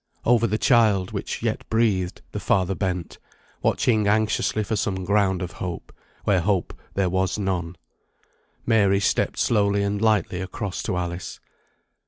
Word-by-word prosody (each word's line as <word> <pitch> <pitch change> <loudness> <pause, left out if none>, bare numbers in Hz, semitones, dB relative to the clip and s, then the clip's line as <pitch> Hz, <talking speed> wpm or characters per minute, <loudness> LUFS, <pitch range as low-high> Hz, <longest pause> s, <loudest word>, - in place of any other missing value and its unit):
Over 115 -1 +4
the 110 +1 0
child, 110 -7 +3
which - - -4
yet - - -1
breathed, 105 -6 0
the - - -4
father 95 -1 +1
bent, 90 -3 -3 0.4
watching 110 -4 +2
anxiously 110 0 +1
for 110 +2 -2
some 95 -3 -1
ground 95 -1 +1
of 90 - -5
hope, 90 -3 -6 0.3
where 95 -4 +2
hope 95 -1 0 0.2
there 95 -1 +2
was 95 +2 0
none. 90 -4 -2 0.9
Mary 100 -4 +3
stepped 100 - 0
slowly 100 -2 +2
and 100 0 -1
lightly 105 -5 +1
across 95 +1 -4
to 95 -5 -2
Alice. 85 0 -4
100 Hz, 145 wpm, -24 LUFS, 90-105 Hz, 0.9 s, Over